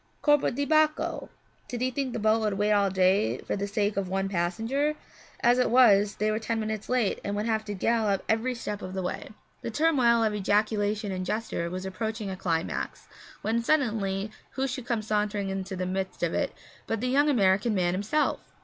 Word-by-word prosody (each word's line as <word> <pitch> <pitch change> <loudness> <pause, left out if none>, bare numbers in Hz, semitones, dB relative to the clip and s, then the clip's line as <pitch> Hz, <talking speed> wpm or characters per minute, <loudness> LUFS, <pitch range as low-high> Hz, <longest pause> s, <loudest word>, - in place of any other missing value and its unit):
Corpo 295 -1 +4
di 285 +3 -2
Bacco! 310 0 +1 0.4
Did 245 -1 -5
he 255 0 +1
think 265 0 -2
the 240 - -3
boat 220 0 +3
would 210 -2 0
wait 205 +1 +2
all 200 -1 +3
day 185 - +2
for - - -1
the 200 0 -2
sake 205 0 -1
of 195 -2 -1
one 195 +1 -1
passenger? 225 - 0 0.5
As 245 +1 +4
it 250 - +3
was, 210 -4 +5
they 215 +1 0
were 215 - -1
ten 225 0 -2
minutes 215 -1 -4
late 245 -5 +1
and 200 - -2
would 210 +1 -1
have 220 -1 0
to 205 -1 -4
gallop 215 -1 +1
every 230 +3 +1
step 210 -3 -5
of 185 +1 -6
the 190 - -2
way. 180 - -4 0.3
The - - -4
turmoil 245 -4 +3
of 215 -1 +1
ejaculation 210 0 0
and 185 -1 -3
gesture 205 -3 -2
was 185 +2 -5
approaching 215 +2 -3
a - - -4
climax; 165 -3 -3 0.4
when 230 +2 +1
suddenly, 215 -7 0 0.2
who 265 +1 -1
should 255 -1 -5
come 230 -3 -1
sauntering 210 -2 -1
into 190 0 -4
the 185 0 -2
midst 190 +1 -3
of - - +1
it - - 0 0.4
but 225 - -1
the 250 - -1
young 285 +4 +3
American 205 -3 +3
man 175 -2 +1
himself! 210 +11 0
215 Hz, 205 wpm, -27 LUFS, 195-235 Hz, 0.5 s, was